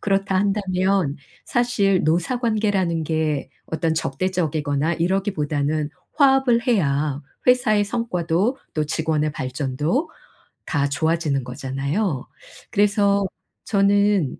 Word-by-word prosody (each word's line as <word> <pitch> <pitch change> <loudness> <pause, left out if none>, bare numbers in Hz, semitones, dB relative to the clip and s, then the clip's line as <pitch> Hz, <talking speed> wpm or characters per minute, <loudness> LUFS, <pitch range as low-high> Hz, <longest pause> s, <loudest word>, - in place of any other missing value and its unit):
그렇다 195 -1 0
한다면 190 -5 +1 0.3
사실 220 -6 +1
노사 175 +10 +1
관계라는 205 -8 0
게 155 -2 -1 0.2
어떤 160 0 -1
적대적이거나 155 -2 -1
이러기보다는 155 -5 -1 0.3
화합을 265 -5 +4
해야 145 - +1 0.3
회사의 225 -5 +4
성과도 200 0 -1 0.2
또 155 -1 0
직원의 155 -1 0
발전도 140 - -2 0.6
다 145 -3 0
좋아지는 155 -3 0
거잖아요. 135 +5 -2 0.4
그래서 200 -1 +2 0.4
저는 200 - +2
180 Hz, 255 characters per minute, -22 LUFS, 150-205 Hz, 0.6 s, 화합을